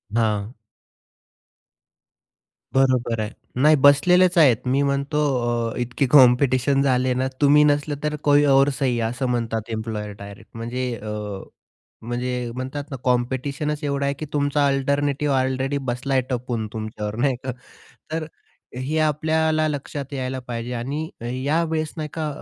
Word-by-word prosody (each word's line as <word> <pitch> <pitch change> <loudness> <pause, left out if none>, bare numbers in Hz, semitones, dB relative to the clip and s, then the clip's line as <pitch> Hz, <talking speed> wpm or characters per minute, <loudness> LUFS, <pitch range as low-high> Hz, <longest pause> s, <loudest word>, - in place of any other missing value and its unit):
हां. 110 -1 0 2.2
बरोबर 130 -4 +2
आहे, 105 - -3 0.3
नाही 155 +2 +6
बसलेलेच 180 +6 +5
आहेत, 135 -9 +6
मी 135 +2 +2
म्हणतो, 140 +2 0 0.5
अ, - - -8
इतके 125 +3 -1
कॉम्पिटिशन 130 0 +5
झाले 130 -2 +2
ना, 130 +1 0
तुम्ही 145 +1 +6
नसलं 145 0 +1
तर 150 0 -1
कोई 145 0 +6
और 135 +1 +5
सही 125 -3 +1
असं 130 +2 -3
म्हणतात 115 -2 -2
एम्प्लॉयर 110 -2 -4
डायरेक्ट, 100 0 -11
म्हणजे 120 +3 -4 0.2
अ, 105 -2 -5 0.6
म्हणजे 120 +1 -3
म्हणतात 130 +3 -5
ना, 135 - -4
कॉम्पिटिशनच 135 +5 -1
एवढं 140 -1 -1
आहे, 140 0 0
की 155 - -5
तुमचा 145 0 +1
अल्टरनेटिव्ह 140 +1 0
ऑलरेडी 130 +2 0
बसलाय 135 +2 -1
आहे 130 - -1
टपून 120 -3 -2
तुमच्यावर 110 -1 -5
नाही 130 +2 +1
का. 130 - -2 0.6
तर 160 0 -2 0.5
हे 130 +5 -2
आपल्याला 155 +1 +1
लक्षात 145 -1 -5
यायला 130 -1 -3
पाहिजे 120 0 -4
आणि 140 +7 -3 0.4
या 160 +4 +2
वेळेस, 155 -1 -2
नाही 155 -1 -4
का, 160 -2 -2
135 Hz, 140 wpm, -23 LUFS, 120-145 Hz, 2.2 s, नाही